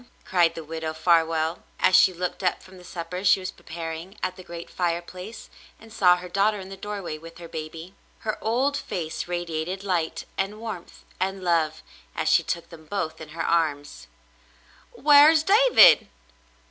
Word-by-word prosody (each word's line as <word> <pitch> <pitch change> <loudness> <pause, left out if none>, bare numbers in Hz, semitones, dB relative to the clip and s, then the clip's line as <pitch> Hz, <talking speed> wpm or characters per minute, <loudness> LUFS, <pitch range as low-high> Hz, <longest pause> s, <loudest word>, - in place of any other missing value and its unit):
" - - -33
cried 175 -3 +2
the 165 - -6
Widow 160 0 -5
Farwell, 165 -1 +2 0.2
as 185 - +4
she - - +7
looked 180 0 -4
up 180 - 0
from 185 0 -15
the - - -14
supper 175 +1 -6
she 195 - +5
was 185 - -5
preparing 165 +4 -8
at 185 - -1
the 185 - -11
great 170 -1 -8
fireplace, 180 +4 -4 0.3
and 225 0 -15
saw 180 -5 +5
her 180 0 -8
daughter 200 +3 +1
in 190 0 -9
the 195 - -7
doorway 195 -6 -6
with 165 +1 -12
her 170 -1 -9
baby. 160 +3 -8 0.3
Her 215 -1 -4
old 255 +6 +1
face 165 - -4
radiated 175 +1 -3
light 175 -5 -1
and 200 +2 -2
warmth 220 -6 -8 0.2
and 190 0 -2
love 160 -3 0 0.3
as - - 0
she - - +5
took 170 0 -4
them 160 -2 -13
both 160 -5 -3
in 155 - -9
her 165 +2 -4
arms. 150 -4 -1 0.9
"Whar's 300 +2 +7
David 455 +7 +6
175 Hz, 170 wpm, -25 LUFS, 165-195 Hz, 0.9 s, she